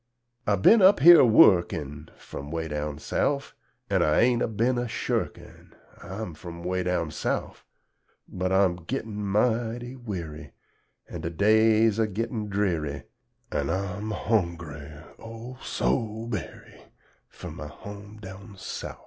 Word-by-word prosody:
I 100 - +4
bin 205 - +6
up 190 -5 +6
here 170 +3 +10
a - - +6
wuckin', 85 -8 +4
From 70 +1 -9
'weh 80 0 -3
down 75 -1 -3
Souf, 140 - -1 0.3
An' - - +1
I 75 - +3
ain't 120 0 +3
a - - +2
bin 120 +3 0
a 120 - -2
shurkin' - - -4 0.3
I'm 95 -2 -6
frum 85 +2 -9
'weh 90 +1 -1
down 90 -3 -1
Souf; - - -3 0.6
But 95 0 -3
I'm 95 -2 +3
gittin' 110 -5 -4
mighty 115 +4 0
werry, 85 - -7 0.5
An' - - -7
de 85 - -3
days 110 +4 +4
a 110 - +3
gittin' 110 +1 -3
drerry, 85 -9 -1 0.5
An' 70 -1 -1
I'm 100 +2 -3
hongry, 85 -9 -2 0.2
O, 115 +3 -9
so 110 -1 -1
berry, 115 -3 -7 0.5
Fur - - -9
my 75 - -7
hom' 100 +6 -10
down 100 0 -11
Souf. - - -6
100 Hz, 140 wpm, -26 LUFS, 85-115 Hz, 0.6 s, here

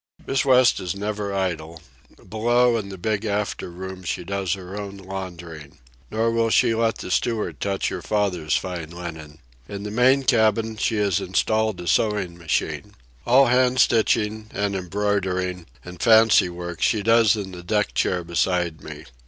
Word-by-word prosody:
Miss 135 - 0
West 130 -2 +4
is 90 +1 -4
never 105 0 -3
idle. 85 -4 -3 0.5
Below, 120 +2 +2
in 105 -3 -3
the 95 - -8
big 105 +3 -2
after 105 -3 -2
room, 95 +1 -8
she 90 - -3
does 95 -1 -2
her 95 0 -7
own 100 -1 -6
laundering. 85 -6 -8 0.3
Nor 115 +1 0
will 115 0 +1
she 115 - +3
let 115 0 +1
the 90 - -7
steward 110 +2 -1
touch 100 -1 -1
her - - -5
father's 90 -7 0
fine 90 -4 -4
linen. 80 -3 -8 0.3
In 100 0 -6
the 105 - -5
main 130 +4 +3
cabin 110 -3 +2
she 110 +1 -1
has 100 -4 +1
installed 110 +2 0
a - - -8
sewing 100 -1 +1
machine. 85 -2 -3 0.3
All 135 +3 +6
hand 125 +1 +2
stitching, 110 -1 +2
and 100 -1 -1
embroidering, 95 -2 -2 0.2
and 90 -1 -10
fancy 110 -4 +5
work 85 -1 -7
she 110 -3 +2
does 115 -1 +4
in 100 -3 -5
the 90 -1 -9
deck 105 +3 -1
chair 90 -1 0
beside 85 -2 -1
me. 75 -1 -9
100 Hz, 165 wpm, -23 LUFS, 90-110 Hz, 0.5 s, All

